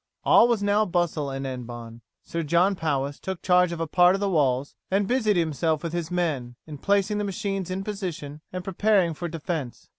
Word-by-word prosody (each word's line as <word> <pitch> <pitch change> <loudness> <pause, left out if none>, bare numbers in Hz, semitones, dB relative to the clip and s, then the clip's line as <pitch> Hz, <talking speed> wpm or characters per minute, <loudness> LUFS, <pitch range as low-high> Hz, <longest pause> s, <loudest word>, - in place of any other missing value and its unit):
All 235 - +6
was 230 -4 +1
now 205 +1 +3
bustle 175 -6 0
in 135 0 -4
Hennebon. 120 -3 -7 0.2
Sir 170 - -3
John 170 +5 +3
Powis 145 -5 -2
took 190 -2 -5
charge 180 -1 +4
of 170 - -4
a 165 - 0
part 180 +3 +4
of - - -3
the 200 -1 0
walls, 140 -4 +1 0.2
and 195 +1 +1
busied 220 -5 +2
himself 160 -1 0
with 170 -1 -4
his 170 -2 -2
men 155 -9 -2
in 150 -3 -9
placing 200 +3 +1
the - - -1
machines 195 -1 -3
in 185 +1 -3
position, 175 -8 -5
and 185 - -4
in - - -17
preparing 195 -2 +2
for 175 +3 -5
defence. 160 -5 -5
175 Hz, 205 wpm, -25 LUFS, 150-195 Hz, 0.2 s, All